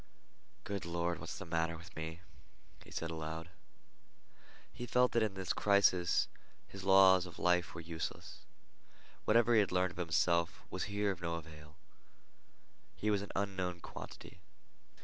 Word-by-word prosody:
"Good 100 -1 -4
Lord, 85 0 -1
what's - - -6
th' - - -7
matter 80 0 -1
with 85 +4 -13
me?" 80 +1 -5 0.6
he - - -15
said 80 0 -4
aloud. 80 +1 -5 1.2
He 120 - -6
felt 125 +1 +3
that 115 - +2
in 105 -3 0
this 95 -2 -1
crisis 95 -4 +3 0.4
his 100 -1 -9
laws 95 -1 +6
of 85 - -12
life 90 0 +2
were 85 - -5
useless. 80 0 -6 0.9
Whatever 115 +2 +4
he 110 - +7
had 100 - +2
learned 90 0 +2
of 95 - -14
himself 85 0 +1
was 95 - -2
here 100 0 0
of 95 - -7
no 85 -1 -1
avail. 75 -2 -10 1.2
He 105 - 0
was 100 -1 +2
an 100 - -7
unknown 95 -3 -2
quantity. - - -10
90 Hz, 150 wpm, -35 LUFS, 85-100 Hz, 1.2 s, he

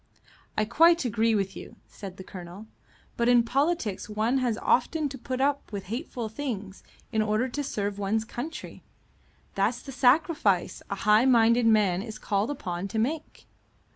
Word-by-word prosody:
"I 215 - +2
quite 330 +7 +4
agree 225 -1 +2
with 195 -2 -1
you," - - -10
said 190 -2 -10
the 190 - -8
Colonel. 185 +2 -10 0.5
"But 235 0 +2
in 240 -1 +6
politics 255 - -1
one 220 +5 +1
has 240 -4 0
often 310 +3 +1
to 270 - -7
put 255 +1 -4
up 280 -1 0
with 200 -2 -4
hateful 245 -3 -4
things 215 -5 -5 0.3
in 220 -2 +1
order 215 +4 +1
to 290 +4 -3
serve 205 -5 -3
one's 215 +3 0
country. 255 +8 -7 0.7
That's 215 +5 0
the 275 - -8
sacrifice 255 - +2
a 200 - -2
high 215 +3 +5
minded 235 -2 +4
man 205 -5 +3
is 220 0 -7
called 200 +2 -1
upon 190 -9 -4
to 205 - -5
make." 295 +8 -3
225 Hz, 165 wpm, -27 LUFS, 205-260 Hz, 0.7 s, in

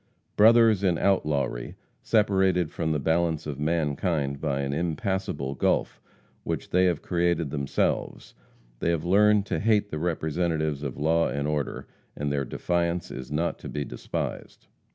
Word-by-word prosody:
Brothers 110 -2 +6
in 90 -4 +2
outlawry, 75 -11 0 0.3
separated 95 -6 +2
from 80 -1 -2
the 75 - +1
balance 80 +1 0
of 75 -2 -5
mankind 75 -2 -1
by 70 -3 -1
an 70 0 -2
impassable 80 -3 -2
gulf - - 0 0.4
which - - -4
they 90 +1 +4
have 85 -4 0
created 85 -4 0
themselves, 70 -2 -2 0.5
they - - 0
have 85 -1 0
learned 105 +2 +4
to - - -2
hate 105 -1 +2
the 75 - -3
representatives 80 -2 -1
of 70 -4 -5
law 80 +2 +2
and 70 +1 -2
order, 75 -3 -2 0.3
and 75 0 -2
their 70 -1 -1
defiance 85 +5 -1
is 65 +1 -7
not 80 +3 -1
to - - -8
be 70 - -3
despised. - - -5
80 Hz, 150 wpm, -26 LUFS, 75-90 Hz, 0.5 s, Brothers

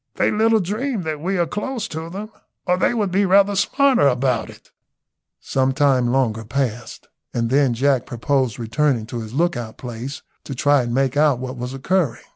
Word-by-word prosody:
They - - +2
little 220 +1 +3
dream 215 +4 -2
that 155 -2 -3
we 185 +5 -1
are 175 - +2
close 210 +6 -4
to 160 +1 -6
them, 205 +5 -7 0.3
or 180 -1 +2
they 185 - +2
would 205 -5 0
be 195 +2 +2
rather 200 +1 +4
smarter 260 - +3
about 125 -3 0
it." - - -16 0.7
Some 130 0 0
time 130 -3 +2
longer 115 -4 0
passed, 120 -1 -3 0.3
and 115 0 -1
then 135 -3 +3
Jack 135 +1 +1
proposed 130 -1 -1
returning 115 +1 0
to 120 +1 -6
his 110 +1 -7
lookout 130 -9 -1
place, 125 +3 -7 0.2
to 135 - -6
try 145 +2 +3
and 120 -1 -3
make 135 +1 +1
out 145 -3 +4
what 130 +1 -6
was 125 +1 -5
occurring. 160 0 0
140 Hz, 185 wpm, -21 LUFS, 125-185 Hz, 0.7 s, rather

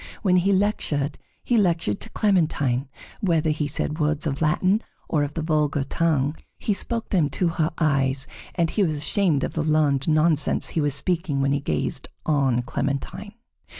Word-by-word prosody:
When 185 -3 +4
he 185 +3 +2
lectured, 165 -8 0 0.2
he 240 - +2
lectured 170 - +1
to - - -6
Clementine; 150 - +1 0.3
whether 165 -5 +1
he 150 -1 -1
said 150 +2 -3
words 150 0 0
of 140 -2 -2
Latin 185 +7 +2 0.3
or 150 - +1
of 145 0 -3
the 160 - -2
vulgar 150 -3 +1
tongue, 150 -1 0 0.2
he 210 - 0
spoke 230 +3 -1
them 165 -7 +2
to 175 +2 0
her 165 -1 0
eyes; 135 -4 +1 0.3
and 170 -2 +1
he 215 - 0
was 160 -6 +2
ashamed 150 0 +1
of - - -2
the 160 - -1
learned 150 -3 +2
nonsense 155 -1 +2
he 160 - -1
was 145 -2 +1
speaking 170 -3 0
when 135 0 +1
he 140 - +1
gazed 75 - -2 0.2
on 135 -5 +2
Clementine. 140 - -3
155 Hz, 175 wpm, -24 LUFS, 140-170 Hz, 0.3 s, When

